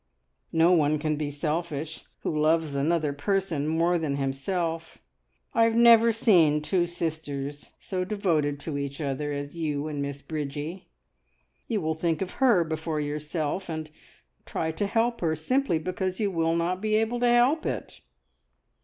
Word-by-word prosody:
"No 165 +2 +4
one 155 -3 +3
can 155 0 -1
be 150 -1 -2
selfish 155 +1 -3 0.2
who - - -1
loves 155 0 +2
another 150 +1 +1
person 165 -1 -1
more 170 +2 +2
than 150 -3 -1
himself. 165 +5 -2 0.6
I 230 - +4
have 225 0 +1
never 235 -1 +7
seen 170 -10 +4
two 175 +1 +1
sisters 150 -4 -4
so 185 -2 -3
devoted 170 -8 0
to 145 -2 -3
each 140 0 -4
other 145 0 -2
as 145 +2 -5
you 150 -3 -2
and 145 -2 -3
Miss 140 0 -5
Bridgie. 150 +4 -5 0.8
You 220 -4 -1
will 160 0 0
think 165 +2 -1
of 185 - -6
her 210 -9 +5
before 160 -1 -3
yourself, 150 +4 -3
and 155 -1 -5 0.5
try 160 0 -2
to 200 +6 -2
help 235 +2 0
her, 160 -2 +1
simply 255 - +1
because 185 +3 -3
you 205 -3 +1
will 165 -1 +1
not 175 +2 -1
be 215 0 +1
able 225 +2 +1
to 245 - +3
help 245 +7 +3
it!" - - -5
160 Hz, 160 wpm, -27 LUFS, 150-185 Hz, 0.8 s, never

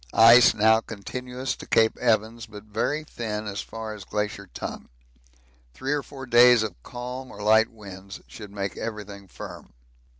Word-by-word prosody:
Ice 115 +2 +8
now 110 +1 +4
continuous 125 +5 -5
to - - -11
Cape 110 0 +3
Evans, 115 -1 0
but 105 -2 -11
very 115 +9 -2
thin 110 -7 -5
as 100 -1 -4
far 110 -1 -7
as 105 -2 -9
Glacier 105 -2 -4
Tongue; - - -7 0.9
three 135 +2 -2
or 145 - 0
four 135 -1 -10
days 120 -1 +6
of 105 -4 -3
calm 125 - -7
or 105 - -9
light 110 +1 +5
winds 100 -3 -10
should 105 -2 -10
make 100 -1 -4
everything 105 -3 -7
firm. - - -10
110 Hz, 160 wpm, -25 LUFS, 105-125 Hz, 0.9 s, Ice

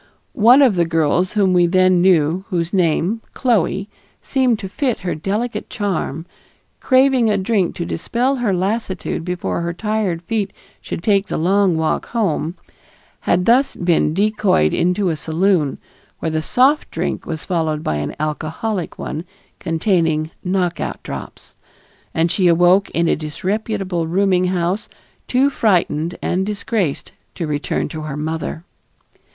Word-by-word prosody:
One 250 +4 +6
of 230 -9 +3
the 170 - +3
girls 165 +3 +1
whom 195 -3 +3
we 175 -1 +4
then 185 0 +4
knew, 175 -1 +3
whose 170 -2 -2
name, 180 +4 +1
Chloe, 200 -5 +1 0.3
seemed 255 -4 +1
to 195 - -6
fit 250 +4 -2
her 180 - -2
delicate 210 +9 -3
charm, 175 - -3 0.5
craving 260 -3 +3
a 205 - +2
drink 190 -2 0
to 170 - -3
dispel 245 +12 -1
her 240 -5 0
lassitude 190 -1 -2
before 180 -1 -2
her 170 0 -2
tired 210 -4 -1
feet 205 0 -2 0.3
should 165 - -6
take 200 -1 +2
the - - -2
long 185 +1 +2
walk 160 0 -1
home, 180 -7 -1 0.6
had 180 +1 +1
thus 255 +4 +3
been 170 -3 +1
decoyed 205 - +2
into 180 +2 +1
a 160 - 0
saloon, 160 -1 +1 0.4
where 160 - -3
the 155 0 0
soft 265 - +2
drink - - -3
was 160 -2 -5
followed 160 -4 -1
by 75 - -1
an 75 0 -4
alcoholic 160 +6 -3
one 155 - -5 0.4
containing 165 -2 0
"knockout 180 -2 -2
drops," - - -8 0.6
and 165 +1 +1
she 185 0 +2
awoke 175 +3 +4
in 170 0 0
a - - +3
disreputable 185 +2 -2
rooming 185 +1 +2
house 180 +2 -1 0.4
too 265 +3 +2
frightened 175 - +1
and 185 +2 0
disgraced 205 - -2 0.2
to 170 - -3
return 145 -1 -2
to 155 +1 -6
her 150 -2 -5
mother. 160 +1 -4
180 Hz, 145 wpm, -19 LUFS, 165-210 Hz, 0.6 s, One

